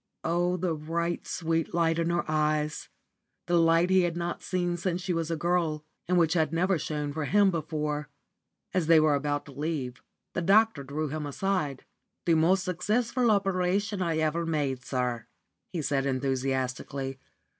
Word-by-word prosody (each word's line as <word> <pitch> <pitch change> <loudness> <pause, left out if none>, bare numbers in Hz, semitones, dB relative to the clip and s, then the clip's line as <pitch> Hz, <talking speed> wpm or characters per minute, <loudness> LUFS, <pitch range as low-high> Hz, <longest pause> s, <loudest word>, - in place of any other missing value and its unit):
Oh, 175 +2 +1
the 180 -1 0
bright, 170 +3 -2
sweet 165 -1 -1
light 165 -1 +2
in 165 0 +1
her 170 0 0
eyes! 155 -1 0 0.6
the 175 - +2
light 165 +2 +4
he 190 0 +6
had 175 -1 -1
not 175 0 -3
seen 175 -1 -1
since 175 0 -2
she 180 0 -2
was 165 -1 -1
a 165 - 0
girl, 160 -2 0 0.2
and 180 +1 +2
which 165 -2 +3
had 160 -4 +1
never 180 +1 +1
shone 150 -1 -3
for 155 0 -2
him 200 +3 +4
before. 150 -3 -2 0.6
As 175 -4 +1
they 165 -1 +7
were 155 -1 +4
about 145 0 -1
to 145 - -11
leave, 140 -3 -3 0.3
the - - -1
doctor 200 -3 +4
drew 145 +3 -3
him 150 0 -4
aside. 150 -3 -2 0.4
"The 170 - +4
most 175 +4 +3
successful 225 +7 0
operation 195 0 +1
I 165 -3 0
ever 160 +2 0
made, 145 -6 -1
sir," 125 -3 -2 0.4
he 170 -4 -3
said, 140 -1 0
enthusiastically. 135 0 -2
165 Hz, 165 wpm, -28 LUFS, 150-180 Hz, 0.6 s, they